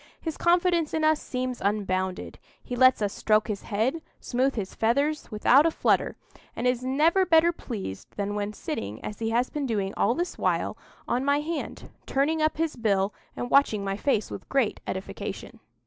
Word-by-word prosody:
His 320 -3 -4
confidence 345 -2 +2
in 315 - 0
us 310 -1 +3
seems 255 -1 -3
unbounded: 190 -2 -1 0.2
he 245 - -5
lets 255 -2 +5
us 200 - -1
stroke 215 0 +2
his 210 -3 -3
head, 235 +10 -1 0.2
smooth 260 +2 0
his 200 -4 -4
feathers, 280 +7 0
without 250 +7 +5
a - - +4
flutter; - - +1 0.4
and 235 - -3
is 250 0 +1
never 310 +9 +3
better 335 -1 +5
pleased 205 - -6
than 205 0 -2
when 205 0 -2
sitting, 105 - -5
as 210 - -6
he 225 -1 -1
has 240 +2 +1
been 290 -2 -2
doing 200 -4 -1
all 235 - +2
this 350 +1 -3
while, - - 0 0.3
on 245 +2 0
my 285 +1 +2
hand, 320 +1 -5 0.2
turning 305 +4 +1
up 310 -1 +1
his 325 -1 -1
bill, 200 -3 +1 0.2
and 245 - -4
watching 225 -7 +4
my 195 0 -1
face 215 -1 0
with 190 - -8
great 270 -6 +1
edification. 190 0 -6
250 Hz, 180 wpm, -26 LUFS, 210-300 Hz, 0.4 s, lets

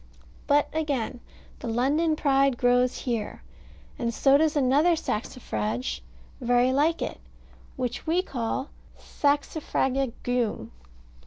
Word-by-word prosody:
But 290 0 +4
again 280 -6 -2 0.4
the - - -6
London 285 +8 +1
Pride 275 -3 +2
grows 245 0 +3
here, 230 -4 -3 0.6
and 235 -1 0
so 270 +4 +4
does 310 +2 +3
another 290 +5 +4
saxifrage 125 - -3 0.4
very 245 +1 +3
like 310 +5 +2
it, - - -5 0.6
which 250 +2 -4
we 345 +3 +2
call 265 -1 -3 0.3
Saxifraga 280 -3 0
Geum. 245 -3 -1
265 Hz, 105 wpm, -26 LUFS, 245-290 Hz, 0.6 s, But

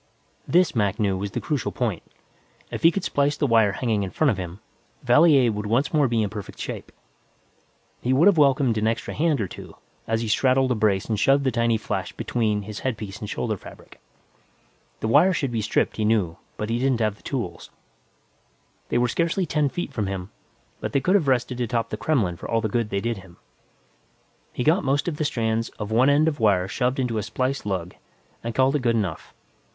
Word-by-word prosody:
This, 175 -3 +3
Mac 105 0 0
knew, 100 -3 +1
was 100 +2 -3
the - - -3
crucial 150 -4 -2
point. 110 -9 -2 0.7
If - - -4
he 165 - +7
could 185 +2 -3
splice 145 +1 +1
the - - +1
wire 115 -5 +4
hanging 110 -4 0
in 95 - -2
front 150 +7 +2
of 105 - -3
him, 90 +1 -6 0.4
Valier 130 -1 +5
would 105 0 -4
once 125 +9 +1
more 150 -3 +4
be 115 -2 +1
in 105 - -1
perfect 105 -3 -8
shape. - - -6 1.1
He 125 - 0
would 135 +6 +4
have 200 -2 +6
welcomed 135 -5 +3
an 110 - +1
extra 115 0 -2
hand 155 -3 +1
or 100 - -1
two, - - -11 0.3
as 115 0 0
he 115 - -3
straddled 130 +3 +2
a - - +2
brace 105 -3 +1
and 110 -3 -2
shoved 135 +5 +3
the 130 - +1
tiny 115 -1 +1
flash 110 - -4
between 105 -4 -1
his 105 +1 -7
headpiece 110 -5 -4
and 105 - -6
shoulder 110 -2 -2
fabric. - - -14 1.0
The - - -1
wire 185 +12 +5
should 140 -7 -1
be 115 -2 -1
stripped, 105 - 0
he 110 - 0
knew, 105 -6 +1 0.2
but 105 +1 -3
he 120 - 0
hadn't 130 -1 +2
the 110 -2 -1
tools. 105 -11 -5 1.2
They - - +1
were 120 0 +3
scarcely 170 +8 0
ten 150 -3 +1
feet 160 -1 -5
from 105 -6 -2
him, 95 0 -5 0.5
but - - -5
could 185 - +2
have 185 -8 +3
rested 125 -1 0
atop 120 -1 -1
the - - -1
Kremlin 105 - 0
for - - -8
all 115 - +2
the 110 - -1
good 115 0 -1
they 100 - -1
did 115 0 -2
him. 95 -2 -14 1.1
He 125 - -3
got 160 +6 +3
most 140 +3 0
of 160 -4 -2
the 155 - -1
strands 115 -4 -1
of 105 0 -5
one 125 +5 +4
end 145 +2 +4
of 150 -4 -1
wire 100 -5 +3
shoved 125 +5 -1
into 125 -4 -1
a - - -1
splice 130 +3 -2
lug, 90 -3 -3 0.5
and 115 0 -4
called 130 +2 +3
it 145 - +1
good 120 -2 +2
enough. 100 -8 -3
115 Hz, 210 wpm, -24 LUFS, 105-135 Hz, 1.2 s, he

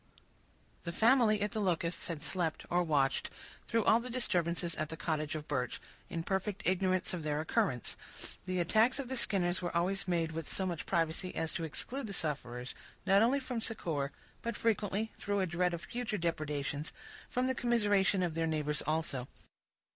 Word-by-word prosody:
The 170 - -3
family 220 0 +5
at 210 - -1
the 220 -2 -1
Locusts 175 -3 0
had 160 -3 -4
slept, 165 0 -1
or 175 +1 +4
watched, 145 -5 +2 0.4
through 230 0 +2
all 220 - +6
the 245 +2 -6
disturbances 175 -8 +1
at 155 0 -2
the 160 - -5
cottage 155 -2 -1
of 150 -1 -5
Birch, 130 -4 -1 0.3
in 165 -1 -3
perfect 195 +2 -1
ignorance 185 +1 +2
of 175 - -2
their 150 -1 -1
occurrence. 130 -6 0 0.5
The 185 0 0
attacks 220 +8 +4
of 275 -3 -4
the 260 - -1
Skinners 185 -7 +1
were 175 -1 -1
always 190 +3 +1
made 165 -2 +1
with 160 -1 -4
so 190 - +1
much 175 -4 -3
privacy 170 +1 0
as 160 - -1
to 165 - -2
exclude 245 - -3
the 200 - -4
sufferers, 125 -7 -2 0.3
not 195 +1 +6
only 250 +5 +4
from 255 -3 -3
succor, 160 -11 -1 0.3
but 235 -2 -3
frequently, 220 -1 0
through 205 0 0
a 190 - +3
dread 180 +1 +1
of 170 -1 -4
future 240 -3 -3
depredations, 150 -3 -2 0.4
from 250 +1 +1
the 260 - +2
commiseration 205 -6 +3
of 170 -3 0
their 165 0 0
neighbors 150 -2 0
also. 155 -5 -1
175 Hz, 180 wpm, -33 LUFS, 160-210 Hz, 0.5 s, all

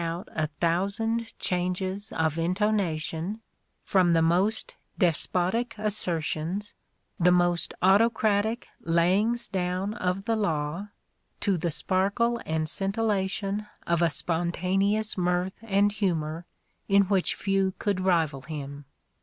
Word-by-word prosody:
His 170 - -1
rich - - -1
voice 165 +1 -3
rang - - -12
out 155 - -2
a - - +1
thousand 200 +9 -1
changes 185 +3 -2
of 160 0 0
intonation, 180 -1 0 0.4
from 185 -4 +3
the 165 -1 +4
most 185 +7 +1 0.2
despotic 185 +6 0
assertions, 185 -2 -1 0.5
the 180 +1 +5
most 175 -1 +2
autocratic 215 +2 +3
layings 190 +8 +2
down 185 +1 -2
of 185 -2 -2
the 225 - +1
law, 170 -2 -1 0.5
to 200 - +2
the 170 0 -1
sparkle 200 +8 0
and 160 0 0
scintillation 200 +1 -1 0.2
of 170 0 +1
a 170 - +4
spontaneous 185 +7 0
mirth 180 +1 0
and 205 -2 +2
humour 170 -5 -2 0.4
in 200 0 +5
which 195 -1 +1
few 195 -1 0
could 200 -3 -1
rival 165 -7 +1
him. 140 0 -7
185 Hz, 125 wpm, -27 LUFS, 170-205 Hz, 0.5 s, the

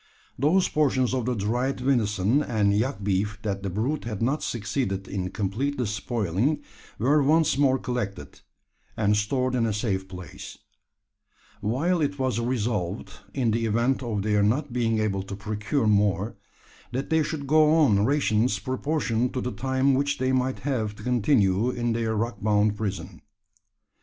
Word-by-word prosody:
Those 170 +7 +3
portions 130 -4 +1
of 125 -3 -1
the 125 0 0
dried 120 +6 -1
venison 120 -2 +2
and 105 -7 +1
yak 110 -2 -1
beef 105 +1 0
that 100 -2 -2
the 100 - -3
brute 120 +11 -2
had 110 -4 -4
not 135 +6 0
succeeded 100 -3 -2
in 95 -2 -3
completely 125 +8 -2
spoiling, 110 - -1 0.3
were 140 +7 +3
once 155 +2 +3
more 135 -1 +3
collected, 120 -7 -5 0.6
and 105 -1 +2
stored 125 +5 0
in 120 -2 +1
a 110 - -1
safe 100 -3 -2
place; 90 -2 -9 1.0
while 155 - 0
it 145 -1 -1
was 130 -4 0
resolved, 115 -6 -2 0.2
in 125 -5 +1
the 115 +1 0
event 120 +5 +1
of 110 -5 -2
their 105 -1 +2
not 125 +6 +1
being 115 -2 +1
able 105 -3 0
to 100 +1 -6
procure 105 +6 -2
more, 105 0 +2 0.6
that 130 +5 -4
they 160 0 +4
should 150 -1 -3
go 155 +2 +4
on 115 -11 +4
rations 115 -4 +2
proportioned 130 +1 -1
to - - 0
the 125 - -3
time 130 +2 +1
which 140 +2 +1
they 130 0 0
might 130 0 0
have 115 -6 -2
to - - -12
continue 115 -3 +2
in 120 -2 -1
their 115 -1 -1
rock 115 +2 -2
bound 105 0 +2
prison. 100 -2 -5
115 Hz, 160 wpm, -26 LUFS, 105-130 Hz, 1.0 s, they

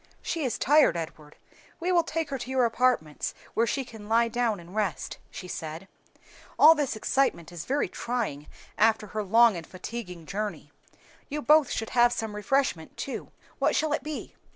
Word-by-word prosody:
"She 330 -2 -2
is 255 - -1
tired, 295 - +4
Edward; 155 -2 -7 0.4
we 360 +2 0
will 350 -1 +5
take 325 -2 -3
her 270 - -2
to 245 - -6
your 260 -2 +3
apartments, 230 -10 0 0.2
where 230 +1 +2
she 270 +1 -1
can 220 -3 -11
lie 230 +1 +3
down 230 -3 0
and 170 +2 -13
rest," 205 -8 -2
she 185 - -8
said. 160 +2 -6 0.7
"All 315 +2 +9
this 290 -6 -1
excitement 220 - 0
is 170 -2 -7
very 280 +3 0
trying 225 - -3 0.3
after 220 +1 +4
her 215 - -1
long 225 +2 +5
and 165 -2 -7
fatiguing 185 -3 -7
journey. 205 +4 -4 0.6
You 300 0 -3
both 305 -2 +5
should 225 - -3
have 240 -1 +5
some 220 -3 -3
refreshment 210 -6 0
too. 275 - -5 0.3
What - - +2
shall 310 -1 +1
it 300 - 0
be?" 300 +2 -6
230 Hz, 175 wpm, -27 LUFS, 185-275 Hz, 0.7 s, All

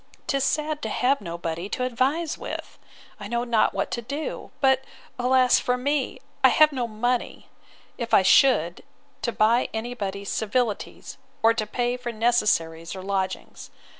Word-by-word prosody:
'Tis 275 -1 0
sad 300 0 -1
to - - -3
have 270 +1 +1
nobody 170 0 -5
to 250 - -2
advise 270 +7 0
with!—I 205 - -10
know 235 +2 -1
not 235 -2 +2
what - - -3
to 235 - -2
do. 280 +6 -5
But, 265 -1 +3 0.4
alas 255 0 +4
for 250 0 0
me! 275 0 -1 0.2
I 260 - +8
have 305 +3 +5
no 250 -4 -2
money, 240 +3 -2 0.5
if 235 -1 -4
I 190 - +6
should, 185 - +4 0.4
to 235 - -1
buy 230 +3 +2
any 235 +2 -3
body's 200 -3 -5
civilities, 220 0 -2 0.2
or 225 0 +6
to 215 -2 -2
pay 245 +2 -1
for 245 -1 -5
necessaries 210 -8 +1
or 190 - -7
lodgings. 190 -1 -3
240 Hz, 155 wpm, -25 LUFS, 205-260 Hz, 0.5 s, I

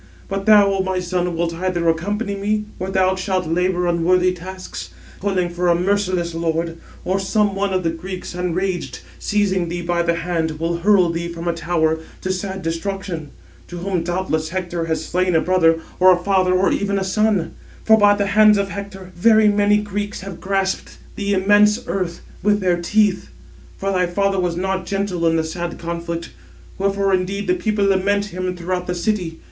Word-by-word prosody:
But 195 0 -4
thou, 205 -2 +6
O 195 - -1
my 190 -1 -1
son, 180 -1 -1
wilt 170 0 -1
either 175 0 -1
accompany 200 +6 0
me, 210 +2 -1
where 185 +1 -3
thou 190 -1 +2
shalt 185 -1 -1
labour 180 +2 0
unworthy 180 +2 +2
tasks, 185 +1 -8 0.3
toiling 185 -3 0
for 175 +1 -1
a 170 - +4
merciless 185 -2 0
lord; 165 0 -2 0.3
or 190 +2 +1
some 200 +1 +1
one 200 0 0
of 185 -1 0
the 165 - +1
Greeks, 180 +3 -7
enraged, 180 +1 -2 0.2
seizing 190 -4 0
thee 175 0 -4
by 170 0 0
the 170 0 +1
hand, 165 -2 -2
will 170 +1 -1
hurl 185 -1 +4
thee 170 0 -3
from 170 0 -6
a 170 - +2
tower, 160 -1 0 0.2
to 185 - -1
sad 190 0 -5
destruction; 165 -1 -4 0.4
to 175 - -8
whom 180 0 -1
doubtless 170 -2 -2
Hector 175 -1 -3
has 160 -1 -2
slain 180 -1 0
a - - +5
brother, 165 -2 +3 0.2
or 185 0 +7
a 180 - +5
father, 185 -2 +2
or 190 +1 +3
even 200 0 0
a 195 - 0
son; 205 -1 +1 0.3
for 220 - +7
by 205 -1 +5
the 200 0 0
hands 210 +1 +5
of 200 0 -1
Hector 200 -2 -8
very 215 +3 +5
many 205 0 +3
Greeks 205 0 -4
have 190 -2 -8
grasped 195 0 -2 0.2
the 200 -1 0
immense 205 +3 +4
earth 180 -3 -3 0.2
with 205 +1 +2
their 180 -3 +1
teeth. 205 +1 +1 0.5
For 195 0 -2
thy 180 -2 +1
father 195 +2 0
was 175 -2 0
not 190 0 -2
gentle 195 -4 -1
in 165 - +3
the 160 - +1
sad 170 +2 -4
conflict; 170 0 -5 0.5
wherefore 195 0 +1
indeed 190 +2 -1
the - - +2
people 215 - 0
lament 200 +1 +2
him 185 0 -3
throughout 180 +1 -3
the 180 - -2
city. 175 -3 -2
185 Hz, 185 wpm, -20 LUFS, 170-200 Hz, 0.5 s, or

